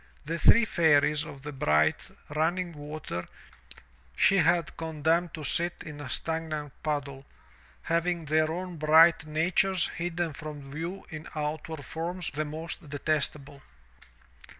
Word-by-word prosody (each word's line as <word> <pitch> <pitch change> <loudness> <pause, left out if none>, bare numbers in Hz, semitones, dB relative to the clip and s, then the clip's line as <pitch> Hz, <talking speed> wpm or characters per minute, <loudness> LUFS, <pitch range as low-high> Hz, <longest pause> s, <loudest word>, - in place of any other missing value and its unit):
The 165 +2 -2
three 230 +6 +7
Fairies 150 -5 +3
of 135 -1 -10
the 150 - -5
bright, 80 - +2 0.2
running 170 +4 0
water 150 - -6 0.9
she 195 - +5 0.3
condemned 160 +1 0
to 155 - -7
sit 170 +5 0
in 150 -2 -8
a 135 - -7
stagnant 155 -1 -3
puddle, 140 -3 -3 0.6
having 170 0 0
their 155 +1 +2
own 180 0 -5
bright 160 +1 +6
natures 175 +4 +2
hidden 170 -2 -2
from 145 -2 -8
view 170 +6 -5
in 155 0 -7
outward 150 0 -4
forms 175 +2 -3
the 155 +1 -2
most 160 +1 -6
detestable. 145 -1 -1
155 Hz, 125 wpm, -28 LUFS, 150-170 Hz, 0.9 s, three